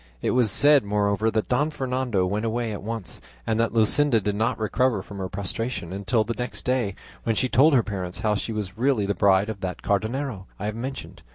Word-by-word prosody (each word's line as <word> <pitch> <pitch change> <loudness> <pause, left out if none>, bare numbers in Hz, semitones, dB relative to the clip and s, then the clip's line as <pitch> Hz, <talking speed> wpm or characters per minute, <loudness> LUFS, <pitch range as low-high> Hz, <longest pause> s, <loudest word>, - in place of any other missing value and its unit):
It - - 0
was 125 -3 +3
said, 145 +7 +6
moreover, 105 +1 +1
that 110 -1 -1
Don 145 +5 +1
Fernando 130 -8 -1
went 100 +4 -1
away 115 0 -1
at 105 - -5
once, 110 -2 -5 0.2
and 110 0 0
that 115 0 +2
Luscinda 115 +3 +4
did 105 0 -1
not 115 +4 0
recover 110 -1 0
from 100 -1 -9
her 95 -1 -3
prostration 100 -1 -4
until 110 +4 +1
the 115 +2 -3
next 125 +1 -5
day, 125 -6 0 0.3
when 115 - 0
she 130 - +1
told 140 +5 +5
her 120 - +4
parents 95 -2 -5
how 110 -1 +2
she 105 +2 -3
was 105 -1 -5
really 125 -5 +2
the 100 - 0
bride 100 0 +3
of 110 -3 -5
that 90 -1 -5
Cardenio 110 0 -1
I 100 - -5
have 105 0 -2
mentioned. 130 +4 -6
110 Hz, 215 wpm, -25 LUFS, 100-125 Hz, 0.3 s, said